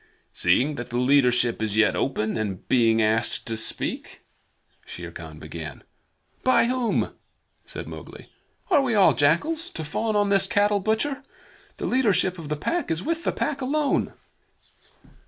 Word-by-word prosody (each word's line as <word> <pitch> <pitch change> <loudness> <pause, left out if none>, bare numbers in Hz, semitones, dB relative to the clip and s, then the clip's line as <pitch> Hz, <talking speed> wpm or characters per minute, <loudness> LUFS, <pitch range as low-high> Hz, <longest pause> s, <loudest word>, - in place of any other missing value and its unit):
"Seeing 145 +4 +2
that 120 - -6
the 120 - -3
leadership 125 -3 +3
is 110 -1 -2
yet 110 - +4
open, 110 -5 -1
and 105 -4 -4
being 115 -3 +3
asked 110 +2 0
to 115 - -2
speak 110 - -2 0.3
" - - -39
Shere 85 -1 -8
Khan 80 -2 -10
began. 80 0 -8 0.6
"By 255 - +4
whom?" 250 -1 0 0.5
said - - -7
Mowgli. - - -11 0.4
"Are 305 - +5
we 250 -4 0
all 190 -7 +6
jackals, 170 - +1
to 160 - -6
fawn 215 +9 -2
on 205 -1 +2
this 195 -1 +4
cattle 205 -1 +2
butcher? 220 +8 0 0.6
The - - -4
leadership 190 -8 +1
of 155 -3 -8
the 150 - -1
Pack 345 - -2
is 165 +1 -1
with 330 +1 -2
the - - +2
Pack 275 -1 -2
alone." 285 +2 0
160 Hz, 155 wpm, -24 LUFS, -, 0.6 s, all